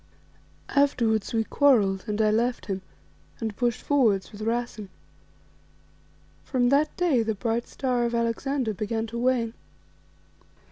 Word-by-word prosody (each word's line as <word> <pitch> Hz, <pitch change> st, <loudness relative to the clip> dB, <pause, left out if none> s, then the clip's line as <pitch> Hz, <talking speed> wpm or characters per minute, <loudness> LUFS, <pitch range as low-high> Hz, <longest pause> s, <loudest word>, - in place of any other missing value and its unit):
Afterwards 235 Hz, -7 st, +2 dB
we 225 Hz, -1 st, +1 dB
quarrelled, 215 Hz, -8 st, +3 dB
and 210 Hz, 0 st, -2 dB
I 215 Hz, -, +3 dB
left 235 Hz, +3 st, 0 dB
him 195 Hz, -2 st, -3 dB, 0.6 s
and 220 Hz, -2 st, -3 dB
pushed 240 Hz, 0 st, -1 dB
forward 220 Hz, -10 st, +2 dB
with 210 Hz, -, -10 dB
Rassen. 225 Hz, -2 st, -2 dB, 1.5 s
From 245 Hz, -2 st, +1 dB
that 290 Hz, +3 st, +2 dB
day 335 Hz, -9 st, +3 dB
the 220 Hz, -1 st, -1 dB
bright 230 Hz, +3 st, -2 dB
star 250 Hz, -3 st, -1 dB
of 235 Hz, 0 st, -1 dB
Alexander 235 Hz, +1 st, -1 dB
began 220 Hz, +3 st, -2 dB
to 230 Hz, +1 st, -5 dB
wane." 240 Hz, -2 st, +1 dB
230 Hz, 130 wpm, -26 LUFS, 215-250 Hz, 1.5 s, quarrelled